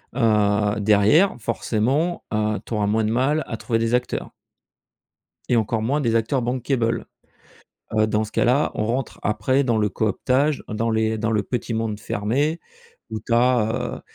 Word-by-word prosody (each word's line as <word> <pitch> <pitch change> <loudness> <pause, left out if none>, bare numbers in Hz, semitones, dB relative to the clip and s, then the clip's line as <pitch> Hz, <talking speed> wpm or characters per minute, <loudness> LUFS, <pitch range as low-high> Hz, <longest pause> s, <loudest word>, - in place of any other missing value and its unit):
Heu, 105 -3 +2
derrière, 105 - +4
forcément, 125 +9 -1
heu, 105 0 0
tu - - -6
auras 105 -2 0
moins 110 +2 +1
de 110 - 0
mal 140 +6 +1
à 115 - -4
trouver 115 0 -1
des 115 +1 0
acteurs 125 0 -3 1.2
et 125 - +3
encore 110 0 0
moins 140 +7 0
des 115 -5 0
acteurs 120 +4 0
bankable, 120 -1 -1 0.9
heu. 110 0 +3
Dans 110 0 0
ce 110 - -10
cas - - +1
là, 130 +5 +2
on 110 - -1
rentre 125 +2 -2
après 105 +7 +1
dans 120 -3 +1
le 105 -1 +2
cooptage, 130 +9 0
dans 115 +2 -1
les 110 0 0
dans 110 +1 -1
le 105 -2 +1
petit 120 +2 -3
monde 110 -2 -2
fermé 135 +12 -1 0.5
où 110 - -4
tu 115 +3 -1
as, 120 -2 +1
heu, - - -15
115 Hz, 175 wpm, -22 LUFS, 105-125 Hz, 1.2 s, derrière